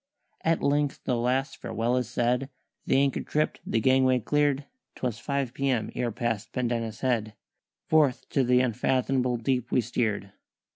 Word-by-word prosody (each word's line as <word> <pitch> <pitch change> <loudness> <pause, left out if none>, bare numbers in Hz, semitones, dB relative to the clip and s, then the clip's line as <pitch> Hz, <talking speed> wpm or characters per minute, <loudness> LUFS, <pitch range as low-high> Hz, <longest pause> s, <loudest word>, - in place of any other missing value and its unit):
"At 165 0 +1
length 145 0 +1
the 125 - 0
last 130 +4 0
farewell 115 +2 -1
is 125 -3 -1
said, 125 +2 0 0.4
The - - +3
anchor 140 -1 +2
tripped, 150 +1 -1
the 115 - +1
gangway 130 +1 +4
clear'd; 145 +3 +1 0.3
'Twas 120 -3 -3
five 140 -1 -2
p.m. 130 -5 0
ere 120 -1 -1
past 115 -1 -2
Pendennis 115 -3 -2
Head 115 -4 0 0.5
Forth 150 -5 +2
to 135 - +2
th' 125 +1 +4
unfathomable 125 +1 +1
deep 125 +1 -1
we - - +3
steer'd. 110 -4 -1
125 Hz, 150 wpm, -27 LUFS, 120-135 Hz, 0.5 s, gangway